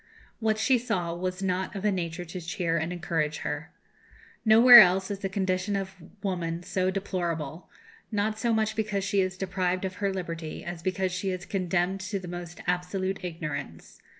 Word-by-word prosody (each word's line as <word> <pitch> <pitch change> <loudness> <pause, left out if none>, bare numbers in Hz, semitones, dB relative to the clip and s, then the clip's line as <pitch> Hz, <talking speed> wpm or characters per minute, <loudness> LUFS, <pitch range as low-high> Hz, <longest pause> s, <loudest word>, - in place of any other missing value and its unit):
What 220 -1 +1
she 240 +3 +3
saw 180 -8 -2
was 185 +2 -3
not 185 +1 -1
of 195 +1 -4
a 210 - +4
nature 175 -2 -3
to 180 +2 -7
cheer 170 0 -1
and 165 +1 -1
encourage 165 -3 -1
her. - - -3 0.7
Nowhere 235 +2 +10
else 190 0 +5
is 200 - -3
the 195 - -3
condition 190 +1 -1
of 195 -1 -3 0.3
woman 175 -3 -2
so 185 +1 0
deplorable; 175 -5 -3 0.4
not 215 +1 0
so 235 +1 +1
much 220 -1 +1
because 210 -3 -1
she 200 0 +2
is 185 0 -2
deprived 185 -1 -1
of 190 0 -5
her 200 -1 0
liberty 165 -4 -5
as 175 -1 -5
because 185 +1 -1
she 185 +2 -2
is 185 0 -4
condemned 185 0 0
to 190 +2 -3
the 185 -2 -7
most 175 0 -7
absolute 185 +2 -1
ignorance. 150 - -6
185 Hz, 180 wpm, -28 LUFS, 175-195 Hz, 0.7 s, Nowhere